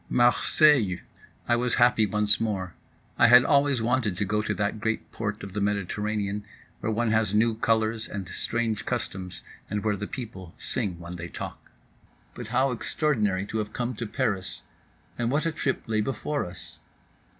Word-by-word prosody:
Marseilles! 120 - +4 0.5
I 120 - +4
was 120 +1 +1
happy 120 -3 +4
once 105 +1 +3
more. 95 -6 -2 0.5
I 120 - +7
had 125 +1 +8
always 140 -4 +3
wanted 115 -5 +1
to 100 - 0
go 105 +2 0
to 105 0 -2
that 105 +1 -1
great 110 +1 -2
port 105 -1 -4
of 100 -1 -7
the 105 - -2
Mediterranean, 105 +1 -1 0.4
where 110 - -1
one 115 +1 +1
has 110 -2 +2
new 115 +2 +4
colors 110 0 0
and 100 -3 -5
strange 115 +2 -2
customs, 95 -1 -3 0.3
and 105 -1 -2
where 105 -1 +1
the 100 +1 -5
people 100 -9 -8
sing 90 -4 -2
when 85 +1 -8
they 85 0 -6
talk. - - -8 0.6
But - - -7
how 135 +1 +2
extraordinary 110 -6 0
to 110 +2 -3
have 105 0 -4
come 125 +1 -2
to 115 - -3
Paris—and 115 +1 -4
what 145 +5 +1
a 165 - +1
trip 140 -4 -1
lay 110 -1 0
before 135 +2 -2
us. 90 0 -10
110 Hz, 170 wpm, -27 LUFS, 100-120 Hz, 0.6 s, had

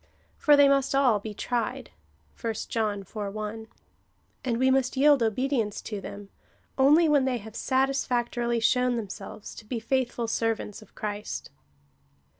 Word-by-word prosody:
For 295 -1 +5
they 285 0 +7
must 275 -1 +2
all 255 -6 +4
be 210 +1 -7
tried, 235 0 -3 0.5
(1 230 -2 -1 0.2
John 215 -3 -1
iv. 190 - -18
1,) 215 +2 -4 0.8
and 240 -3 0
we 260 +2 +3
must 260 0 +1
yield 285 -1 +5
obedience 230 -1 0
to 210 -3 -5
them, 200 +1 -9 0.5
only 295 +5 +5
when 290 -3 +4
they 255 -2 0
have 220 0 -10
satis 270 +2 +1
factorily 240 -1 0
shown 250 +1 +3
themselves 210 -1 -7
to - - -11
be 230 +2 -4
faithful 240 0 -1
servants 225 -1 -2
of 215 - -18
Christ. 210 0 -5
235 Hz, 150 wpm, -27 LUFS, 215-265 Hz, 0.8 s, they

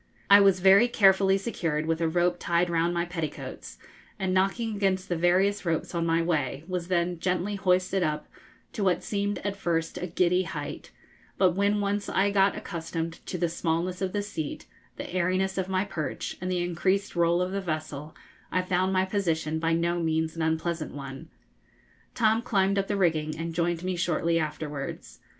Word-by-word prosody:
I 200 - +10
was 195 -2 +4
very 195 +5 +7
carefully 195 -3 +4
secured 165 -8 -2
with 165 +1 -1
a 165 - +2
rope 175 +1 +1
tied 175 0 +1
round 170 +1 +2
my 170 0 0
petticoats, 160 - -6 0.4
and, 190 -1 -1
knocking 200 +4 +1
against 190 -2 0
the 175 - +1
various 180 +4 +2
ropes 165 -1 -2
on 170 -1 0
my 165 0 +2
way, 150 -4 -1
was 180 -2 -3
then 175 -1 0
gently 185 +3 -1
hoisted 185 -1 +1
up 150 -2 -1 0.5
to 210 - -2
what 185 -2 +2
seemed 205 -1 -1
at 200 -1 -1
first 165 -4 -2
a 180 - -3
giddy 180 +1 +2
height; 150 -5 -6 0.5
but 185 - +4
when 200 +3 +1
once 200 0 -1
I 200 +1 +2
got 195 0 +3
accustomed 165 -1 -5
to 180 - -3
the 175 - +1
smallness 170 +2 -2
of 190 -1 -1
the 205 +1 -1
seat, 165 -7 -5 0.3
the - - -6
airiness 185 +2 0
of 190 0 -2
my 190 +1 +1
perch, 160 -6 -4
and 185 0 -2
the 180 -1 0
increased 185 +4 0
roll 170 0 +3
of 180 +1 -1
the 195 0 -2
vessel, 155 -3 -5 0.4
I 185 - +1
found 185 +1 +1
my 190 0 +2
position 165 -5 -1
by 165 0 +1
no 170 +1 +1
means 160 -1 0
an 165 - -4
unpleasant 160 0 -1
one. 135 +3 -8 0.9
Tom 225 -1 +3
climbed 200 -3 +1
up 195 - -1
the 205 - -1
rigging 155 -4 +1
and 165 +1 -4
joined 170 0 -1
me 185 0 -1
shortly 170 -1 +1
afterwards. 150 - -5
175 Hz, 185 wpm, -27 LUFS, 165-190 Hz, 0.9 s, I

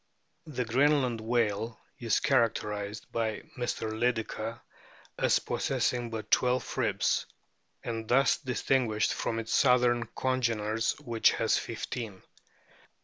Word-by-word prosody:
The 125 -5 -2
Greenland 130 -1 +2
whale 115 -1 0 0.2
is 115 -3 +1
characterised 110 -6 0
by 110 -2 -1
Mr. 120 -3 -2
Lydekker 115 0 -2 0.6
as - - +4
possessing 120 -1 -1
but 110 -2 -6
twelve 125 0 +2
ribs, - - +1 0.6
and 115 -1 -4
thus 135 +3 +4
distinguished 125 -5 +1
from 115 - -2
its 115 0 -3
southern 125 -3 +4
cono 130 +2 -1
ener, 115 +2 0
which 120 -5 +3
has 115 - +2
fifteen. 115 -3 -6
115 Hz, 110 wpm, -29 LUFS, 110-125 Hz, 0.6 s, as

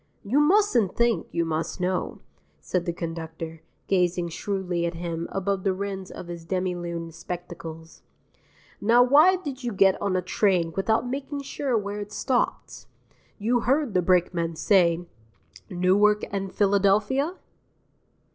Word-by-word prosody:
"You 240 +8 +2
mustn't 300 - +3
think, 235 -1 +1
you 170 0 0
must 160 +2 -3
know," 180 0 -2 0.4
said 180 -2 -2
the - - +1
conductor, 165 -1 -6 0.2
gazing 180 -2 +1
shrewdly 180 -1 -2
at 170 - -5
him 170 0 -4
above 195 0 -1
the 195 - +2
rims 195 -1 -5
of - - -8
his 170 -1 -7
demi 185 +1 -1
lune 170 -1 -5
spectacles. 165 -1 -8 0.8
"Now, 235 +3 +5
why 300 +9 +6
did 285 -8 -6
you 240 - -2
get 195 -2 +3
on 200 -2 0
a 185 - 0
train 180 -3 +1
without 220 +5 +1
making 280 +2 -4
sure 270 -3 -1
where 205 0 -3
it 205 0 -7
stopped? 250 +3 -2 0.5
You 235 +4 +1
heard 270 0 +1
the 180 - +3
brakeman 170 -2 +1
say: 175 -1 +3 0.6
'Newark 200 +3 +3
and 195 -1 -3
Philadelphia'? 205 - +2
190 Hz, 140 wpm, -25 LUFS, 170-225 Hz, 0.8 s, why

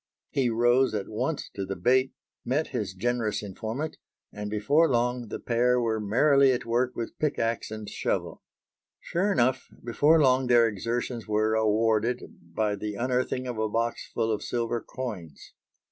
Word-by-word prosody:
He 130 -3 +1
rose 120 +2 +3
at 100 -2 -3
once 135 +8 -2
to 100 - -4
the 95 0 -4
bait, 130 +4 +2 0.3
met 145 +6 -1
his 100 -3 -3
generous 115 +1 -1
informant, 110 +9 -5 0.4
and 105 0 -5
before 140 +11 +3
long 120 0 0
the - - -5
pair 125 +1 +2
were 115 -2 0
merrily 135 +6 +4
at 125 -1 -2
work 120 +2 0
with 115 - -6
pickaxe 115 -6 -1
and 110 -1 -7
shovel. - - -3 0.6
Sure 190 +4 -1
enough 125 -5 +1 0.2
before 145 +7 +4
long 130 -2 +3
their 120 -1 +5
exertions 115 +3 -3
were 110 +1 +1
awarded 110 +2 +1 0.2
by 100 +5 -2
the 105 +1 -5
unearthing 125 +2 -1
of 120 -3 -4
a 110 0 0
box 115 +2 -2
full 115 -1 0
of 105 - -1
silver 120 -1 -2
coins. 100 - -7
115 Hz, 160 wpm, -27 LUFS, 110-125 Hz, 0.6 s, their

